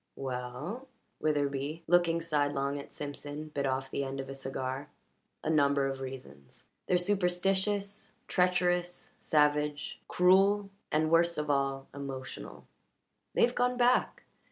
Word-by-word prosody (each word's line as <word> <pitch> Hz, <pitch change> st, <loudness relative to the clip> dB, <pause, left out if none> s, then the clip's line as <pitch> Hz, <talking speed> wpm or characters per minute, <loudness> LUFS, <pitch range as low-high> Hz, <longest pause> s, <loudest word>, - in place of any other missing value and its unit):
"We 135 Hz, -2 st, -4 dB
ell" 125 Hz, -, -5 dB, 0.3 s
Witherbee, 145 Hz, +1 st, -1 dB
looking 170 Hz, -1 st, +3 dB
sidelong 145 Hz, -3 st, 0 dB
at 140 Hz, -, -10 dB
Simpson, 145 Hz, +1 st, -6 dB
bit 140 Hz, -2 st, -1 dB
off 135 Hz, 0 st, -2 dB
the 140 Hz, -, -1 dB
end 135 Hz, 0 st, -4 dB
of 135 Hz, 0 st, -5 dB
a -, -, -4 dB
cigar 135 Hz, +1 st, -4 dB, 0.5 s
"a -, -, -1 dB
number 140 Hz, -2 st, +3 dB
of 135 Hz, 0 st, -2 dB
reasons. 75 Hz, -, -9 dB, 0.2 s
They're 180 Hz, -, +4 dB
superstitious, 195 Hz, +3 st, 0 dB, 0.2 s
treacherous, 180 Hz, -1 st, +1 dB
savage, 150 Hz, -1 st, +1 dB
cruel, 195 Hz, +2 st, +4 dB, 0.2 s
and 155 Hz, +1 st, +2 dB
worst 170 Hz, +1 st, +4 dB
of 150 Hz, -1 st, 0 dB
all 135 Hz, -1 st, 0 dB
emotional. 130 Hz, -, -7 dB, 0.7 s
They've 240 Hz, +1 st, +4 dB
gone 250 Hz, 0 st, +1 dB
back. 245 Hz, +1 st, +2 dB
150 Hz, 130 wpm, -31 LUFS, 135-180 Hz, 0.7 s, They're